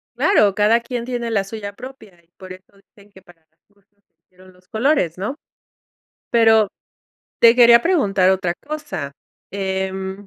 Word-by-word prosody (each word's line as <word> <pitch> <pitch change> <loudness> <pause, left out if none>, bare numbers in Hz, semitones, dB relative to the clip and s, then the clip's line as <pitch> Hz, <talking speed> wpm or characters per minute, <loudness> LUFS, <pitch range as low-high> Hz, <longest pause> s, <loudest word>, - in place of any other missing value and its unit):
Claro, 205 - +2
cada 215 +3 +3
quien 235 0 -6
tiene 240 -2 -4
la 210 -4 0
suya 200 0 -8
propia, 220 -7 -13
y 165 - -38
por 185 -1 -12
eso 185 0 -15 0.3
dicen 205 -1 -21
que 190 - -18
para 175 -3 -22 0.2
gustos 200 -1 -35 0.2
se - - -59
hicieron 185 0 -20
los 180 0 -27
colores, 220 - 0
¿no? 210 +9 -4 1.0
Pero 225 -3 +4 0.7
te 230 0 +6
quería 235 -1 +6
preguntar 200 - +2
otra 185 -2 -1
cosa, 290 - -7 0.4
em, 190 0 -4
200 Hz, 150 wpm, -19 LUFS, 190-235 Hz, 1.0 s, te